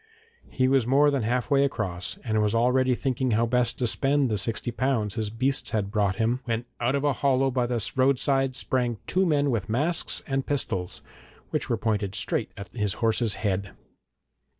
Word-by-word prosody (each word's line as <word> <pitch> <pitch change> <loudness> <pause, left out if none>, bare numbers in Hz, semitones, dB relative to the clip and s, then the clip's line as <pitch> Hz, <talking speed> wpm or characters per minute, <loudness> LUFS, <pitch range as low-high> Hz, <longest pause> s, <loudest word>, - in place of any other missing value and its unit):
He 130 -1 +1
was 130 -3 +2
more 145 +3 +4
than 140 -2 0
half 125 +5 -1
way 140 0 +4
across, 95 -10 -3
and 110 -3 0
was 105 +1 +1
already 125 +2 +3
thinking 130 0 -1
how 115 - +3
best 120 0 +1
to 125 - -1
spend 135 +2 +1
the 105 - +1
sixty 115 +4 -2
pounds 120 -5 -1
his 110 -2 -2
beasts 130 +5 0
had 100 -2 -2
brought 100 -3 +1
him, 115 +3 0
when 115 0 -2
out 120 +3 +1
of 140 - -1
a 145 -1 +2
hollow 135 0 +1
by 125 -1 0
the 120 -2 0
roadside 135 0 +2
sprang 125 -3 -1
two 185 0 +1
men 145 -3 +2
with 110 -5 -2
masks 150 +9 0
and 135 -2 -2
pistols, 95 -10 -2 0.5
which - - -2
were - - +1
pointed 105 -3 -1
straight - - 0
at 100 - -8
his 105 -5 -1
horse's 115 -2 +1
head. 100 -1 -1
125 Hz, 190 wpm, -26 LUFS, 110-135 Hz, 0.5 s, more